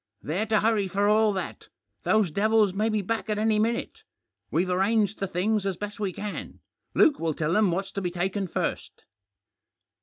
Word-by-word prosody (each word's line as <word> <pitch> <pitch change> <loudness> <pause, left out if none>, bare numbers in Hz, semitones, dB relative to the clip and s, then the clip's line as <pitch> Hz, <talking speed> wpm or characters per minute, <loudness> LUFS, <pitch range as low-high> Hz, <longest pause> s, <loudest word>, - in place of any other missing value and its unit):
They're 185 +9 -1
to 215 -1 +2
hurry 215 -3 +2
for 200 +2 +1
all 215 0 +4
that; 190 - -5 0.4
those 215 -6 +3
devils 210 +1 +3
may 215 +3 0
be 215 -2 0
back 225 +3 -3
at 210 - 0
any 215 0 +2
minute. 230 +2 -1 0.5
We've 180 +3 +1
arranged 205 +2 +1
the 195 - -1
things 200 +4 0
as 195 -3 -2
best 205 +1 -6
we 200 -3 -1
can; 205 +3 -6 0.4
Luke 300 -4 +5
will 160 -2 -1
tell 155 +1 -1
them 210 0 +4
what's 190 +3 -2
to 200 - -4
be 180 - -1
taken 190 +3 -2
first." - - -4
205 Hz, 185 wpm, -26 LUFS, 185-215 Hz, 0.5 s, Luke